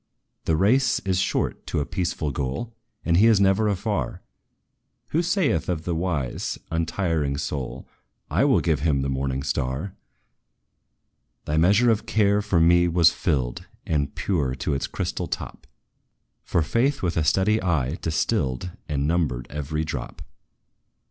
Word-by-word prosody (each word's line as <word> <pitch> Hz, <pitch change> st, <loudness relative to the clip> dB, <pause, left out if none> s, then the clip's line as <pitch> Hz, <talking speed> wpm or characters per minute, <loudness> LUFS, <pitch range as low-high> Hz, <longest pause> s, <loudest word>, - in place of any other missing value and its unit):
"The 80 Hz, -, +2 dB
race 125 Hz, +9 st, +3 dB
is 95 Hz, -1 st, 0 dB
short 95 Hz, -, -1 dB
to -, -, -1 dB
a 70 Hz, -, -1 dB
peaceful 85 Hz, -5 st, -2 dB
goal, 70 Hz, -, -3 dB, 0.3 s
And 85 Hz, 0 st, +3 dB
He 110 Hz, +5 st, +6 dB
is 110 Hz, -3 st, +5 dB
never 100 Hz, +2 st, +3 dB
afar, 100 Hz, 0 st, -2 dB, 0.9 s
Who 165 Hz, -, +1 dB
saith 175 Hz, -, +1 dB
of 80 Hz, -3 st, -1 dB
the 85 Hz, -, -2 dB
wise, 80 Hz, -7 st, -2 dB
untiring 80 Hz, -3 st, 0 dB
soul, 70 Hz, -3 st, -4 dB, 0.4 s
'I -, -, +3 dB
will -, -, +4 dB
give 80 Hz, -4 st, +1 dB
him 70 Hz, -3 st, +1 dB
the 70 Hz, -, -1 dB
morning 65 Hz, 0 st, -2 dB
star!' 70 Hz, +5 st, -2 dB, 1.5 s
"Thy 75 Hz, -, -1 dB
measure 100 Hz, +9 st, +5 dB
of 110 Hz, +1 st, -1 dB
care 105 Hz, -2 st, +3 dB
for 100 Hz, -4 st, +1 dB
me 85 Hz, +1 st, +5 dB
was 85 Hz, -1 st, +5 dB
filled, 60 Hz, -3 st, -1 dB, 0.2 s
And 70 Hz, -3 st, -1 dB
pure 75 Hz, -10 st, -1 dB
to 65 Hz, -, -2 dB
its 70 Hz, -, -1 dB
crystal -, -, -3 dB
top; -, -, -6 dB, 0.8 s
For 85 Hz, -, +1 dB
Faith, 120 Hz, -, 0 dB
with 85 Hz, -2 st, 0 dB
a 80 Hz, -, +1 dB
steady 95 Hz, +8 st, +2 dB
eye, 80 Hz, -5 st, 0 dB
distilled 80 Hz, -, -1 dB, 0.2 s
And 70 Hz, -1 st, 0 dB
numbered 75 Hz, -7 st, 0 dB
every 75 Hz, +2 st, -3 dB
drop. 70 Hz, -6 st, -6 dB
85 Hz, 150 wpm, -24 LUFS, 70-100 Hz, 1.5 s, He